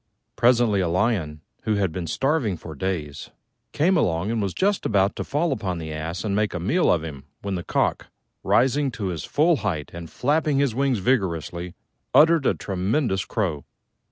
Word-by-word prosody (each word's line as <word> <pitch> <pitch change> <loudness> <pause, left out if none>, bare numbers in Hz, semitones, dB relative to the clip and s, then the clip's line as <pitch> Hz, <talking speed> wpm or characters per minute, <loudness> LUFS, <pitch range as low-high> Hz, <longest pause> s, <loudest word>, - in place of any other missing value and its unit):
Presently 120 -2 +3
a 90 - +1
Lion, 85 -5 0 0.2
who 110 - 0
had 100 -4 0
been 85 0 -4
starving 135 - 0
for 80 0 -9
days, 75 -3 -4 0.4
came 180 +6 +2
along 95 - +1
and 115 -2 0
was 100 -3 -2
just 200 +1 +1
about 100 -2 +2
to - - -3
fall 155 +3 0
upon 95 -8 -2
the 80 -1 -5
Ass 80 +4 -4
and 100 -3 -1
make 105 -2 0
a - - -2
meal 140 - +2
of 85 -3 +1
him 70 -4 -8 0.2
when 100 -1 -2
the 90 -2 -3
Cock, - - 0 0.4
rising 135 +3 +2
to 100 -3 -3
his 85 -5 -4
full 160 +2 +3
height 85 - -3
and 85 -1 -8
flapping 150 +1 +1
his 140 -4 +2
wings 135 0 +1
vigorously, 90 - -1 0.4
uttered 160 -2 +6
a - - +2
tremendous 95 +2 -1
crow. 85 - -2
100 Hz, 185 wpm, -24 LUFS, 85-135 Hz, 0.4 s, uttered